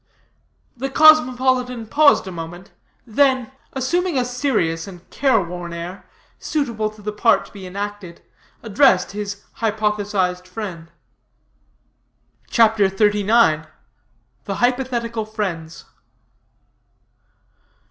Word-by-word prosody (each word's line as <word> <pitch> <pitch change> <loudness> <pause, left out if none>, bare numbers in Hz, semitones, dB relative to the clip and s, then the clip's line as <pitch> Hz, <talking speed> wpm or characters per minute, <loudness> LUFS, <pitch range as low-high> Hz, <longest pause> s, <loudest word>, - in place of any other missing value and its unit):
The 265 +3 -4
cosmopolitan 255 -5 +4
paused 285 +3 +4
a 190 - -6
moment, 175 +2 -8 0.3
then, 260 +1 +2 0.2
assuming 340 +5 0
a 250 - +1
serious 235 - -1
and 180 -2 -12
care 265 -5 +2
worn 175 -1 -6
air, 170 +3 -8 0.3
suitable 235 -8 -2
to 215 -1 -16
the 210 - -3
part 225 +2 +3
to - - -17
be 195 -3 -9
enacted, 200 -2 -6 0.4
addressed 220 -3 +3
his 200 0 -6
hypothesized 205 -4 -1
friend. 180 -4 -7 1.6
CHAPTER 220 -4 +4
XXXIX. 205 -4 +2 0.8
THE 195 - -3
HYPOTHETICAL 240 -2 -1
FRIENDS. 175 -7 -5
215 Hz, 95 wpm, -20 LUFS, 185-250 Hz, 1.6 s, cosmopolitan